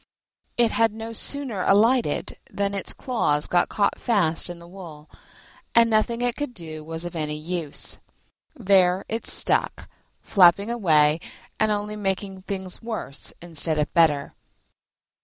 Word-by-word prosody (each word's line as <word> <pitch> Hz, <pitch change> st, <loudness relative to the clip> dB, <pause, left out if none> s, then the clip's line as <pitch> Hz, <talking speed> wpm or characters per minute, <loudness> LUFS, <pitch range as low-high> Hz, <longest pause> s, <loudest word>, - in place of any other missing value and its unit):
It 235 Hz, -2 st, +3 dB
had 225 Hz, -2 st, +2 dB
no 225 Hz, +1 st, -7 dB
sooner 255 Hz, -4 st, 0 dB
alighted 230 Hz, +6 st, +2 dB
than 200 Hz, 0 st, -2 dB
its 195 Hz, -, -4 dB
claws 150 Hz, -, -1 dB
got 175 Hz, -1 st, +1 dB
caught 200 Hz, -1 st, 0 dB
fast 180 Hz, -8 st, +1 dB
in 175 Hz, -, -7 dB
the 170 Hz, 0 st, -14 dB
wool, 170 Hz, -5 st, -12 dB, 0.7 s
and 230 Hz, 0 st, +5 dB
nothing 230 Hz, +2 st, +1 dB
it 245 Hz, -1 st, 0 dB
could 290 Hz, -4 st, -5 dB
do 155 Hz, -2 st, -9 dB
was 165 Hz, +2 st, -7 dB
of 175 Hz, -, -7 dB
any 150 Hz, -1 st, -3 dB
use: 160 Hz, -1 st, -5 dB, 0.6 s
there 190 Hz, -6 st, +2 dB
it 225 Hz, +1 st, -4 dB
stuck, -, -, +3 dB, 0.3 s
flapping 200 Hz, +3 st, +4 dB
away, 155 Hz, -9 st, +3 dB, 0.4 s
and 215 Hz, 0 st, +2 dB
only 210 Hz, 0 st, -2 dB
making 195 Hz, -1 st, -3 dB
things 190 Hz, -1 st, -6 dB
worse 220 Hz, -11 st, -6 dB
instead 160 Hz, -2 st, +3 dB
of 150 Hz, 0 st, -1 dB
better. 150 Hz, -5 st, +2 dB
190 Hz, 140 wpm, -24 LUFS, 165-220 Hz, 0.7 s, and